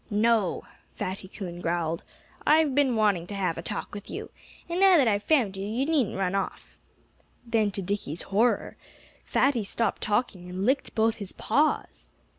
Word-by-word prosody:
"No!" 215 -2 +2 0.3
Fatty 190 +1 -4
Coon 180 -3 -7
growled. 170 -1 -1 0.4
"I've 305 -2 +4
been 270 -3 +3
wanting 205 -6 +2
to 205 - -6
have 185 -4 0
a - - -3
talk 205 - -5
with 205 0 -8
you. - - -6 0.4
And 345 +1 -2
now 385 -2 +7
that 270 -6 +4
I've 205 -2 +2
found 235 -8 +2
you, 195 +1 -4
you 235 +6 -1
needn't 290 -11 +1
run 190 -1 0
off." 195 0 -3 0.7
Then, 225 -3 +2
to 195 -1 -4
Dickie's 180 -5 -3
horror, 220 +5 +1 0.5
Fatty 265 -6 +2
stopped 230 +3 -1
talking 205 -4 -1
and 185 +2 -3
licked 265 +4 0
both 220 0 +2
his 200 -3 -6
paws. 295 +7 0
210 Hz, 170 wpm, -27 LUFS, 190-245 Hz, 0.7 s, now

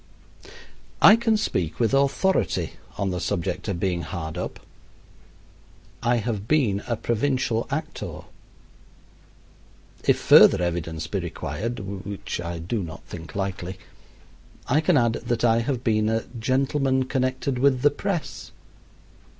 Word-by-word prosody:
I - - +9
can 230 -1 +2
speak 90 - -2
with 115 +1 +2
authority 140 +8 +1 0.2
on 100 -1 -1
the 90 - -2
subject 90 +2 -2
of 95 -4 -2
being 90 -2 0
hard 80 -1 -5
up. 90 - -5 1.4
I 120 0 +2
have 110 -3 -2
been 120 -10 +2
a 115 - 0
provincial 120 -1 0
actor. - - -4 1.8
If - - +3
further - - +7
evidence 80 -2 -2
be - - -2
required, 115 +3 -4
which 100 -1 -5
I 85 0 -4
do 90 +7 -3
not 80 -3 -8
think 80 -2 -10
likely, 95 -2 -3 0.9
I 145 +4 +3
can 170 -1 +3
add 120 -2 +3
that 120 0 -2
I 115 -1 +4
have 125 +1 -2
been 110 -2 +2
a 110 0 0 0.2
"gentleman 130 +2 +1
connected 130 0 -1
with 130 -1 +3
the 145 - +6
press." 165 -4 -4
115 Hz, 130 wpm, -24 LUFS, 95-130 Hz, 1.8 s, I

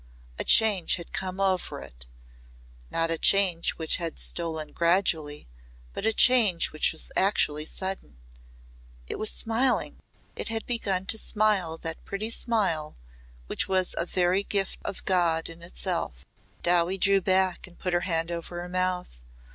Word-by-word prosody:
A - - 0
change 210 -6 +5
had 170 -2 -10
come 185 0 -4
over 190 -2 0
it - - -10 0.8
not 165 0 0
a 165 - -1
change 190 -4 +4
which 160 -1 -1
had 170 -2 -4
stolen 160 -3 -3
gradually 170 -4 +1 0.5
but 220 - -2
a - - +4
change 220 -7 +4
which 155 - +1
was 160 - -4
actually 155 -6 +2
sudden. 190 - -4 0.9
It - - -6
was 215 - +1
smiling 235 +3 0 0.4
it - - -3
had 225 -1 -2
begun 195 -6 -1
to 220 +2 +1
smile 205 -8 +1
that 165 0 -4
pretty 215 +3 -4
smile 195 -11 0 0.5
which - - -1
was 185 -1 0
a 170 - -1
very 180 +2 +1
gift 195 -1 -2
of - - -6
God 170 -3 +2
in 165 0 -11
itself. 65 - -4 0.4
Dowie 175 +2 +2
drew 195 +1 +3
back 185 -1 +1
and 175 - -17
put 180 -1 -3
her 175 - +3
hand 165 -2 -1
over 170 +1 -5
her 175 +1 -6
mouth. 180 - -2
180 Hz, 155 wpm, -27 LUFS, 165-195 Hz, 0.9 s, change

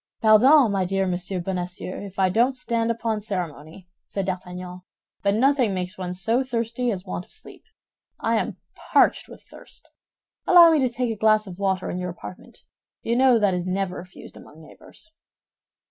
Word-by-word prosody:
"Pardon, 235 +4 +6
my 195 -2 0
dear 195 +1 0
Monsieur 180 +1 -2
Bonacieux, 180 +1 -5
if 200 -1 -10
I 190 -1 +3
don't 240 +7 +2
stand 230 -2 -1
upon 230 -1 -1
ceremony," 175 -4 -6 0.2
said 195 -2 -3
D'Artagnan, 180 -1 -6 0.4
"but 200 0 +1
nothing 255 -4 +2
makes 180 +1 -4
one 180 -2 -5
so 225 +7 0
thirsty 240 0 -2
as 190 -4 -3
want 180 -1 -5
of - - -22
sleep. 435 - -10 0.6
I - - +1
am - - -3 0.2
parched - - +1
with - - -13
thirst. - - -13 0.6
Allow 345 -2 +8
me 315 - +3
to 260 -2 +2
take 245 0 -2
a - - -3
glass 215 0 +3
of 185 -1 -10
water 190 -2 -1
in 180 - -4
your 180 0 -4
apartment; 180 +1 -11 0.4
you 230 - 0
know 255 -1 +5
that 205 -3 +2
is 180 0 -3
never 185 0 -2
refused 180 +1 -12
among 155 - -15
neighbors." 160 - -13
195 Hz, 175 wpm, -23 LUFS, 180-235 Hz, 0.6 s, Allow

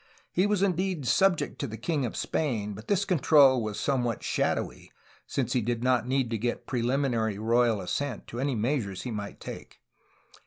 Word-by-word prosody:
He 185 +3 +2
was 205 -2 +1
indeed 185 -5 0
subject 180 +9 +2
to 140 - -2
the 110 -1 -7
king 135 +3 -1
of - - -7
Spain, 110 -9 -1
but 105 +3 -10
this 200 -1 +2
control 145 - +5
was 110 -1 -3
somewhat 125 -5 0
shadowy, - - -1 0.4
since - - -1
he 125 - +2
did 120 +1 -2
not 125 -2 +2
need 130 -2 0
to 115 - -1
get 120 +2 -2
pre 125 - -2
liminary 120 -4 0
royal 115 0 +2
assent 125 +7 -3
to 120 - -6
any 135 0 0
measures 110 -4 -1
he 125 - -4
might 105 -2 -5
take. - - -9
125 Hz, 185 wpm, -28 LUFS, 110-145 Hz, 0.4 s, control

